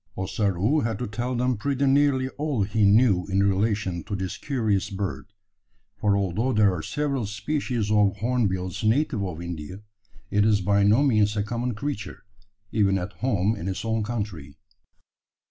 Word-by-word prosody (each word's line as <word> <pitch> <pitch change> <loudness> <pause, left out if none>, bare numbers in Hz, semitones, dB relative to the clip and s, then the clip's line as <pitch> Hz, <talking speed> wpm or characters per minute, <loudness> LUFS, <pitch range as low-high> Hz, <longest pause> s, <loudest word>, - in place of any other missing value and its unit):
Ossaroo 95 - 0
had 115 -5 -1
to 125 - -3
tell 120 +4 -3
them 125 0 0
pretty 140 +4 0
nearly 135 -1 +3
all 145 -6 -1
he 105 +1 +1
knew 100 -3 +4
in 100 0 +1
relation 100 -2 0
to 100 - -3
this 95 -2 -4
curious 110 -8 -1
bird; 100 -1 -4 0.7
for 100 -1 +1
although 100 +6 0
there 105 -3 +4
are 85 - -4
several 140 - -2
species 110 0 -2
of 105 -2 +3
hornbills 100 -6 -1
natives 115 0 +1
of 90 -4 -4
India, 85 +3 -7 0.5
it 105 0 +3
is 105 -1 +3
by 100 +2 +2
no 105 +7 +4
means 110 -6 +2
a 105 - +1
common 120 +2 -3
creature, 130 -3 -5 0.5
even 100 -3 +2
at 95 +2 -5
home 110 -4 0
in 95 -3 -6
its 95 +3 -3
own 110 0 0
country. 100 -11 -5
105 Hz, 165 wpm, -25 LUFS, 95-120 Hz, 0.7 s, knew